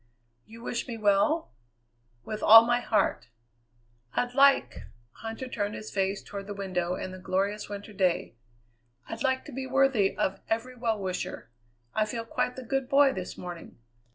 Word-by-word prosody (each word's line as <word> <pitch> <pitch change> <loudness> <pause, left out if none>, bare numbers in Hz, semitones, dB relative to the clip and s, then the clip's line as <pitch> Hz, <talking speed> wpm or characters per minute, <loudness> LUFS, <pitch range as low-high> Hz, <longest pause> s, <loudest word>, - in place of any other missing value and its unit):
"You 230 +1 -12
wish 240 - -3
me 235 -2 -5
well?" 215 +10 +2 0.7
"With 215 - -5
all 225 +1 +9
my 240 +1 +2
heart." 225 -3 0 0.9
"I'd 245 0 0
like" 275 +1 +4 0.4
Huntter 225 +3 -5
turned 205 -4 -3
his 215 - -8
face 195 0 -1
toward 200 -1 -7
the 205 - -5
window 180 -3 -2
and 185 - -5
the 185 - -9
glorious 200 +3 -1
winter 205 +1 -7
day 185 - 0 0.7
"I'd 225 +1 -6
like 260 0 0
to 300 - -9
be 260 0 -5
worthy 265 -6 +2
of 190 - 0
every 230 +3 -1
well 230 -3 -1
wisher. 185 - -5 0.4
I 215 - +2
feel 230 +1 -4
quite 250 +2 -1
the 260 - -7
good 270 +2 -2
boy 275 -1 +5
this 185 -1 -6
morning. 175 -2 -8
220 Hz, 165 wpm, -28 LUFS, 195-250 Hz, 0.9 s, all